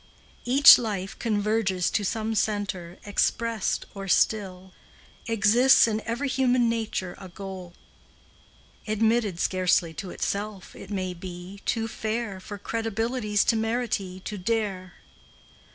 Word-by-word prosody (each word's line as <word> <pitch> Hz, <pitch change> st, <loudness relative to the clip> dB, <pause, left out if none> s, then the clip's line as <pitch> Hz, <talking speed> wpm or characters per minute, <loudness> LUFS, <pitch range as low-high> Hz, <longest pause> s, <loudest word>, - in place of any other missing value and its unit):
Each 270 Hz, +4 st, +9 dB
life 205 Hz, -4 st, -4 dB
converges 210 Hz, -4 st, 0 dB
to 210 Hz, -, 0 dB
some 220 Hz, +2 st, -2 dB
centre 200 Hz, -5 st, -2 dB
Expressed 225 Hz, +1 st, 0 dB
or 195 Hz, -1 st, -7 dB
still; 190 Hz, -2 st, 0 dB, 0.5 s
Exists 230 Hz, +4 st, +5 dB
in 220 Hz, -1 st, -1 dB
every 240 Hz, +5 st, -2 dB
human 255 Hz, -2 st, +2 dB
nature 220 Hz, -6 st, -2 dB
A 190 Hz, -, -10 dB
goal, 185 Hz, -1 st, -9 dB, 1.1 s
Admitted 215 Hz, -3 st, +1 dB
scarcely 180 Hz, -3 st, +1 dB
to 180 Hz, +5 st, -6 dB
itself, 200 Hz, +1 st, -4 dB
it 195 Hz, -, -11 dB
may 185 Hz, -3 st, -3 dB
be, 180 Hz, +2 st, -9 dB
Too 225 Hz, -1 st, 0 dB
fair 220 Hz, -2 st, -3 dB
For 205 Hz, +2 st, -8 dB
credibility's 225 Hz, 0 st, -1 dB
temerity 225 Hz, -4 st, -1 dB
To 205 Hz, +1 st, -6 dB
dare. 195 Hz, -3 st, -2 dB
210 Hz, 115 wpm, -26 LUFS, 190-225 Hz, 1.1 s, Each